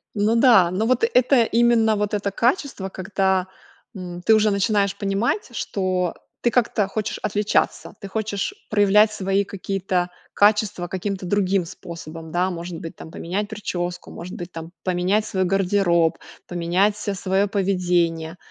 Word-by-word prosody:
Ну 210 +2 +2
да, 230 -7 +6
ну 210 +4 0
вот 255 - +2
это 255 - +4
именно 230 -1 +3
вот 210 0 -1
это 205 -1 -1
качество, 240 - 0
когда, 190 -1 0 0.5
м, 180 -2 -7
ты 220 - +5
уже 215 0 +4
начинаешь 200 0 +1
понимать, 200 - -1
что 185 -3 -1 0.3
ты 240 - +3
как-то 225 -4 +1
хочешь 210 +1 -3
отличаться, 210 +1 0
ты 200 - -7
хочешь 215 - -2 0.2
проявлять 210 +1 +4
свои 195 -1 0
какие-то 190 -2 -2 0.2
качества 205 -3 +2
каким-то 190 +1 -4
другим 195 -1 +1
способом, 165 -2 -9
да. 180 +2 +1
Может 170 -1 -6
быть 165 - -8
там, - - -10
поменять 190 +5 -3
прическу, 180 -4 -4
может 180 +2 -8
быть 175 0 -7
там, 165 0 -8
поменять 185 +4 +1
свой 190 -1 0
гардероб, 180 -3 +2 0.3
поменять 180 +4 +1
ся 205 -1 -3
своё 190 +1 +1
поведение. 180 -4 0
195 Hz, 145 wpm, -22 LUFS, 180-210 Hz, 0.5 s, да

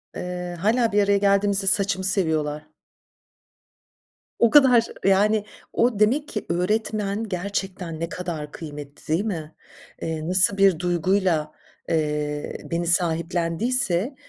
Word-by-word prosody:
Iıı, 180 -1 -5
hâlâ 225 +5 +1
bir 205 0 +3
araya 200 0 +3
geldiğimizde 200 0 +2
saçımı 195 -2 +1
seviyorlar. 155 -6 -1 1.7
O 235 - +5
kadar, 250 -5 +6 0.2
yani, 205 +2 +3 0.3
o, 230 -3 +1
demek 270 +8 +2
ki, 210 - -5
öğretmen 210 +3 -1
gerçekten 185 -3 -4
ne 165 +1 -3
kadar 165 -5 -5
kıymetli 145 -2 -10
değil 195 +7 0
mi? 160 -7 -5 0.5
Eee, 160 -1 -3
nasıl 185 +2 +3
bir 195 -4 +4
duyguyla, 175 -2 +1 0.4
eee, 150 -2 -2
beni 170 0 -1
sahiplendiyse, 175 - 0
185 Hz, 115 wpm, -23 LUFS, 165-205 Hz, 1.7 s, kadar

